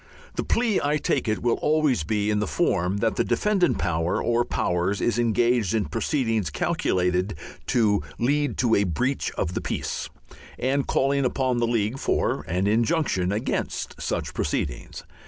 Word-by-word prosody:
The - - -2
plea, 230 -3 +1
I 145 +1 +1
take 135 -4 0
it, 110 0 -1
will 120 -1 +2
always 150 - +2
be 105 +6 0
in 105 - +1
the 105 - -1
form 95 - +1
that 115 -1 +1
the - - +3
defendant 200 -4 +1
power 85 +1 0
or 120 0 +2
powers 90 -1 -1
is 120 0 +1
engaged 115 -2 +2
in 110 - +1
proceedings 115 - 0
"calculated 90 +6 0 0.3
to 105 -6 +2 0.2
lead 140 +1 +1
to 120 -2 +2
a 100 - +4
breach 120 - -1
of 90 - -2
the - - -2
peace," - - -3 0.5
and 135 +2 0
calling 140 +1 +2
upon 130 -1 0
the 120 - +1
League 115 +2 0
for - - 0
an 90 +3 0
injunction 115 - +1
against 110 +6 -3
such - - -2
proceedings. - - -3
115 Hz, 160 wpm, -25 LUFS, 100-135 Hz, 0.5 s, a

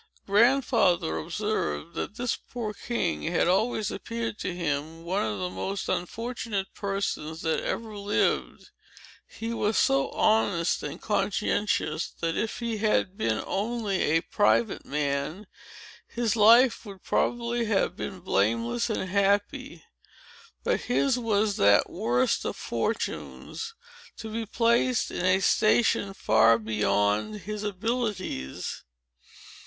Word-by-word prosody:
Grandfather 200 - +3
observed, 185 - -2
that 210 - -4
this 245 0 -1
poor 225 -4 -6
king 200 -4 -2
had 170 +1 +1
always 210 +3 +1
appeared 230 +1 -4
to - - -2
him 165 -1 -3
one 185 +4 -1
of 105 -2 -2
the 90 -1 -2
most 190 - -4
unfortunate 205 +2 -3
persons 195 -5 -3
that 160 - +1
ever 220 -2 -4
lived. 205 0 -1 0.6
He 230 +1 -5
was 210 -2 0
so 135 0 +3
honest 180 -6 +2
and - - -6
conscientious, 205 -5 0
that, 165 -1 -1
if 225 - -2
he 235 -2 -2
had 205 -3 +1
been 115 - -1
only 210 -2 -1
a 160 +2 +2
private 205 +4 +1
man, 145 +6 -2 0.6
his 235 -2 -1
life 230 +3 +6
would 200 -4 -11
probably 235 0 0
have 210 -3 +1
been 185 -2 -6
blameless 115 - 0
and 190 - -2
happy. 205 +9 0 0.8
But - - +1
his 255 +1 +1
was 215 -3 +1
that 100 0 +4
worst 125 +2 +1
of - - -3
fortunes, 230 - -4 0.4
to 220 - -7
be 225 0 -3
placed 235 +2 +2
in - - -3
a 185 +1 +3
station 210 -1 +3
far 110 - +4
beyond 105 - 0
his 210 +3 -5
abilities. 205 - -3
200 Hz, 125 wpm, -27 LUFS, 160-225 Hz, 0.8 s, life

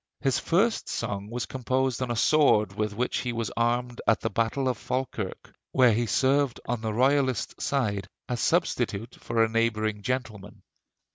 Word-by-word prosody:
His 135 -3 +1
first 210 +7 +1
song 100 0 -3
was 120 -1 -3
composed 130 +1 -1
on 130 - -1
a 120 - -1
sword 110 -6 +4
with 105 0 -2
which 125 +3 -1
he 125 - -2
was 115 -2 -3
armed 120 +1 0
at 115 - +4
the - - -2
battle 115 +5 0
of 125 - -1
Falkirk 125 -7 -4 0.2
where 125 -3 +5
he 120 +2 0
served 135 +4 +2
on 120 -1 -2
the 110 -1 -2
Royalist 130 +1 +1
side 100 -9 -1 0.2
as 120 -1 -2
substitute 120 - 0
for 115 -1 +1
a - - +3
neighboring 110 -2 0
gentleman. 105 -4 -4
120 Hz, 165 wpm, -27 LUFS, 110-130 Hz, 0.2 s, where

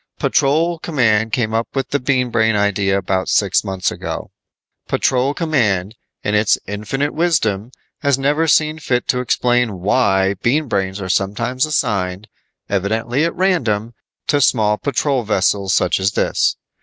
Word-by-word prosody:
"Patrol 160 +3 +1
Command 115 -9 +1
came 110 -3 -1
up 115 +1 0
with 135 -1 -2
the 145 - 0
Bean 125 -1 0
Brain 110 -1 +2
idea 100 -1 +1
about 95 -1 -1
six 100 -2 +2
months 95 -3 -2
ago. - - -6 0.6
Patrol 130 +3 +1
Command, 110 - 0 0.3
in 105 - -1
its 105 0 +3
infinite 110 +9 -3
wisdom, 120 - 0 0.3
has 140 -3 +1
never 145 +4 +1
seen 155 0 +2
fit 125 -5 -1
to 125 - +2
explain 120 -3 +1
why 95 -1 +2
Bean 145 +5 +1
Brains 95 -3 -2
are 95 - -5
sometimes 120 - 0
assigned, 100 -8 -1 0.4
evidently 110 - -1
at 170 - -2
random, 120 - 0 0.3
to 145 -1 +1
small 105 -4 +2
patrol 140 -2 0
vessels 100 -2 0
such - - +2
as 95 +2 0
this. - - +1
115 Hz, 145 wpm, -18 LUFS, 100-140 Hz, 0.6 s, its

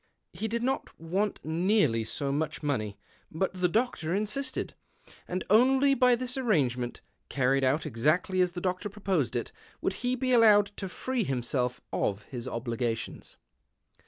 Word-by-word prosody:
He 220 - -3
did 235 +2 -2
not 265 +2 -2
want 190 +6 -1
nearly 160 - +2
so 140 +5 -2
much 155 +2 -2
money, 110 -9 -1 0.3
but 185 +5 -1
the 180 -1 +1
doctor 190 -5 0
insisted, 235 +6 -1 0.5
and 180 +1 -2
only 265 +6 +5
by 250 -2 +4
this 250 +1 -3
arrangement, 130 - 0 0.3
carried 135 0 +2
out 135 +4 +2
exactly 155 +10 +1
as 180 -1 +1
the 175 - -5
doctor 185 +3 -2
proposed 195 - -1
it, 120 - -2 0.3
would - - -1
he 250 +1 +1
be 255 0 -1
allowed 210 -4 +6
to 195 - -4
free 255 +5 -2
himself 125 -3 -1
of 100 +1 -1
his 125 -1 -7
obligations. 115 -2 -3
180 Hz, 150 wpm, -29 LUFS, 130-220 Hz, 0.5 s, allowed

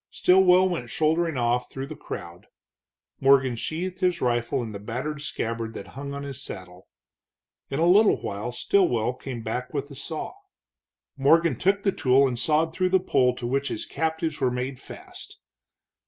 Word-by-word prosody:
Stilwell 185 0 +5
went 165 -10 -3
shouldering 160 +4 +1
off 120 0 0
through 135 0 -5
the 155 +3 -8
crowd. 85 - -8 0.7
Morgan 135 -2 +4
sheathed 175 +9 -4
his 180 -2 +1
rifle 120 +1 0
in 110 - -6
the 100 - -7
battered 130 +8 -4
scabbard 115 -5 -3
that - - -8
hung 140 +1 -7
on 140 - -5
his 140 -1 -7
saddle. 90 -4 -10 0.8
In 135 - -3
a 165 - +2
little 200 +5 +5
while 105 +4 -4
Stilwell 125 - +1
came 125 -2 -7
back 125 +6 -4
with 140 0 -3
a - - -9
saw. 155 +3 -5 0.8
Morgan 160 +2 +4
took 200 - +1
the 195 - +3
tool 135 -3 +3
and 120 -2 -3
sawed 160 +4 +1
through 185 0 +1
the 190 0 +4
pole 125 -8 +2
to 125 - -6
which 135 +3 0
his - - -3
captives 160 -1 -2
were 130 - +3
made 125 +1 -4
fast. - - -11
140 Hz, 170 wpm, -25 LUFS, 120-160 Hz, 0.8 s, Stilwell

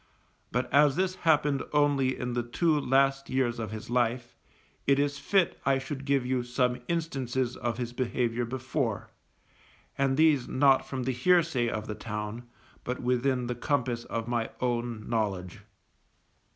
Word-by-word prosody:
But 125 +1 0
as 145 -1 +5
this 185 +1 +1 0.2
happened 145 -3 +3
only 145 -3 +2
in 125 0 -3
the 120 - 0
two 150 +6 +1
last 135 0 +2
years 125 -3 0
of 110 - -3
his 110 0 -7
life, 120 0 0 0.5
it 140 0 +5
is 145 0 0
fit 195 -3 +1
I 135 -1 +3
should 135 +1 -6
give 140 -2 +1
you 130 0 0
some 125 0 0
instances 130 -7 -1
of 120 -2 -3
his 120 -1 -4
behaviour 120 -1 -1
before, 130 -2 -3 0.9
and 135 -1 +2
these 155 -5 +4
not 135 0 +3
from 130 -2 -3
the 130 - 0
hearsay 150 -2 +2
of 110 -2 -3
the 110 - -4
town, 105 +2 -6 0.3
but 125 +1 -3
within 125 +1 +1
the 125 - -2
compass 120 -1 -1
of 115 0 -4
my 120 -2 -1
own 120 -3 -2
knowledge. 100 -6 -2
125 Hz, 155 wpm, -28 LUFS, 120-140 Hz, 0.9 s, as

